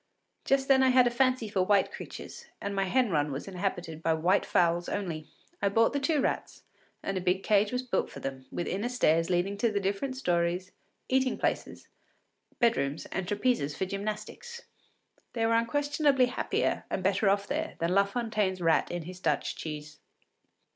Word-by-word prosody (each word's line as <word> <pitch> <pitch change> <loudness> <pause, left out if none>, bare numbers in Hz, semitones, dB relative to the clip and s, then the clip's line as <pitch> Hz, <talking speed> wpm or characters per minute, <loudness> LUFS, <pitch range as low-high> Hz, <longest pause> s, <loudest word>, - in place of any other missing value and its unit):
Just 270 0 +2
then 270 -1 +5
I 260 - +5
had 255 -1 +6
a 240 - +2
fancy 255 -2 +2
for 200 -2 0
white 200 +2 +3
creatures, - - -9
and 200 - -4
my 195 0 +1
hen 245 +2 +2
run 150 -2 +1
was 135 +6 -5
inhabited 175 -4 -3
by 165 -1 +2
white 180 +5 +2
fowls 170 0 +2
only. 165 -6 -3 0.3
I 200 - +3
bought 225 +5 +3
the 285 - +1
two 300 +2 +1
rats, - - -2 0.4
and 195 -1 -1
a - - -6
big 185 +1 +1
cage 210 0 +3
was 250 0 -1
built 250 - -1
for - - -9
them, 135 -1 -6
with 175 - -3
inner 205 +6 -2
stairs 165 -10 +2
leading 185 +3 0
to 230 +1 +2
the 205 - 0
different 200 +7 -2
stories, 175 -3 0 0.4
eating 260 0 +1
places, - - -2 0.7
bedrooms, 150 - +1
and 190 -2 -3
trapezes 205 - 0
for 190 - 0
gymnastics. 215 - -5 0.7
They 230 -2 0
were 230 - +2
unquestionably 285 +3 +2
happier 245 - -1
and 190 - -2
better 195 +2 +2
off 200 0 +2
there 315 +6 -3
than 170 +2 0
La 200 +1 +5
Fontaine’s 210 -3 -1
rat 165 -2 +2
in 175 -1 -4
his 180 +2 -9
Dutch - - 0
cheese. 150 -1 -7
200 Hz, 180 wpm, -29 LUFS, 175-245 Hz, 0.7 s, had